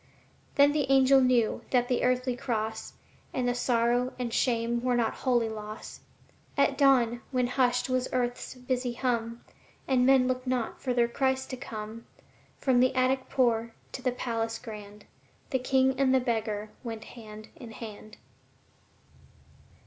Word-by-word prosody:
Then 285 Hz, +1 st, +6 dB
the 290 Hz, -3 st, -1 dB
angel 270 Hz, 0 st, +6 dB
knew 250 Hz, -3 st, +2 dB
that 245 Hz, -1 st, +2 dB
the 250 Hz, -, 0 dB
earthly 250 Hz, 0 st, +1 dB
cross 220 Hz, -3 st, -3 dB, 0.4 s
And 250 Hz, -1 st, 0 dB
the 245 Hz, -, +2 dB
sorrow 245 Hz, +1 st, +1 dB
and 240 Hz, -2 st, -3 dB
shame 235 Hz, -1 st, +1 dB
were 250 Hz, 0 st, +1 dB
not 235 Hz, -2 st, +1 dB
wholly 240 Hz, -3 st, +1 dB
loss. 215 Hz, 0 st, -7 dB, 0.6 s
At -, -, +3 dB
dawn, 245 Hz, -4 st, +3 dB
when 255 Hz, -2 st, +1 dB
hushed 250 Hz, 0 st, +1 dB
was 255 Hz, -1 st, 0 dB
earth's 245 Hz, 0 st, -2 dB
busy 250 Hz, -1 st, -2 dB
hum 235 Hz, -2 st, -2 dB, 0.4 s
And 255 Hz, -2 st, +3 dB
men 260 Hz, -1 st, +5 dB
looked 255 Hz, 0 st, -2 dB
not 250 Hz, -3 st, -2 dB
for 250 Hz, -2 st, -1 dB
their 240 Hz, -1 st, +3 dB
Christ 265 Hz, +2 st, -1 dB
to -, -, -3 dB
come, 220 Hz, -2 st, -8 dB, 0.5 s
From 260 Hz, -3 st, +2 dB
the 255 Hz, +1 st, +3 dB
attic 260 Hz, +1 st, +1 dB
poor 235 Hz, -3 st, +1 dB, 0.2 s
to -, -, -6 dB
the 255 Hz, -, +1 dB
palace 230 Hz, -2 st, -2 dB
grand, 210 Hz, -3 st, -10 dB, 0.5 s
The 260 Hz, -, +1 dB
King 265 Hz, +1 st, +2 dB
and 265 Hz, -1 st, +4 dB
the -, -, +5 dB
beggar 220 Hz, -4 st, -2 dB
went 225 Hz, -2 st, -6 dB
hand 215 Hz, -2 st, -11 dB
in 240 Hz, -, -10 dB
hand. 215 Hz, -1 st, -10 dB
245 Hz, 155 wpm, -28 LUFS, 230-255 Hz, 0.6 s, Then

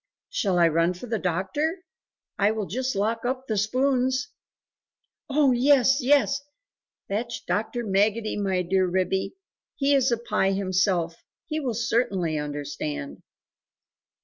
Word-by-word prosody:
"Shall 195 Hz, -, 0 dB
I 170 Hz, -1 st, +6 dB
run 165 Hz, +2 st, +2 dB
for 180 Hz, -, -8 dB
the 225 Hz, -2 st, -2 dB
doctor? 195 Hz, -, -1 dB, 0.6 s
I 200 Hz, +1 st, +4 dB
will 215 Hz, -1 st, -2 dB
just 255 Hz, +7 st, -2 dB
lock 220 Hz, +3 st, 0 dB
up 255 Hz, +1 st, -2 dB
the 220 Hz, -, -2 dB
spoons!" 255 Hz, +5 st, +1 dB, 1.0 s
"Oh 280 Hz, -1 st, +4 dB
yes, 270 Hz, +2 st, +4 dB
yes! 280 Hz, +1 st, +3 dB, 0.7 s
fetch 230 Hz, +4 st, -3 dB
Dr. 235 Hz, +3 st, -1 dB
Maggotty, 215 Hz, +2 st, +1 dB
my 190 Hz, -3 st, 0 dB
dear 185 Hz, +1 st, +2 dB
Ribby: 185 Hz, -, -1 dB, 0.4 s
he 280 Hz, 0 st, +2 dB
is 265 Hz, -2 st, +3 dB
a 235 Hz, -, +2 dB
Pie 195 Hz, -4 st, 0 dB
himself, 185 Hz, -3 st, 0 dB, 0.3 s
he 310 Hz, -, -3 dB
will 255 Hz, -6 st, -2 dB
certainly 225 Hz, -8 st, 0 dB
understand." 140 Hz, -, -5 dB
215 Hz, 130 wpm, -25 LUFS, 185-255 Hz, 1.0 s, I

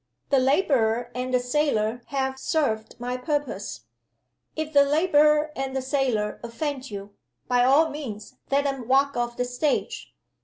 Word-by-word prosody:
The 275 Hz, -, +5 dB
laborer 250 Hz, -5 st, +2 dB
and 250 Hz, +1 st, -3 dB
the 250 Hz, -, +3 dB
sailor 245 Hz, -4 st, 0 dB
have 265 Hz, -1 st, -2 dB
served 225 Hz, -9 st, -1 dB
my 250 Hz, +1 st, -3 dB
purpose. 290 Hz, +1 st, -3 dB, 0.7 s
If 315 Hz, 0 st, -4 dB
the 285 Hz, -, +7 dB
laborer 300 Hz, 0 st, +3 dB
and 270 Hz, 0 st, -3 dB
the 265 Hz, -, 0 dB
sailor 255 Hz, -6 st, 0 dB
offend 265 Hz, +3 st, -4 dB
you, 200 Hz, -1 st, -8 dB, 0.3 s
by 245 Hz, -1 st, +3 dB
all 280 Hz, +6 st, +5 dB
means 225 Hz, -8 st, -7 dB
let 280 Hz, +1 st, +2 dB
them 270 Hz, -4 st, -3 dB
walk 275 Hz, +2 st, +3 dB
off 240 Hz, 0 st, -2 dB
the 250 Hz, -, 0 dB
stage! 295 Hz, -, -2 dB
265 Hz, 150 wpm, -25 LUFS, 245-290 Hz, 0.7 s, the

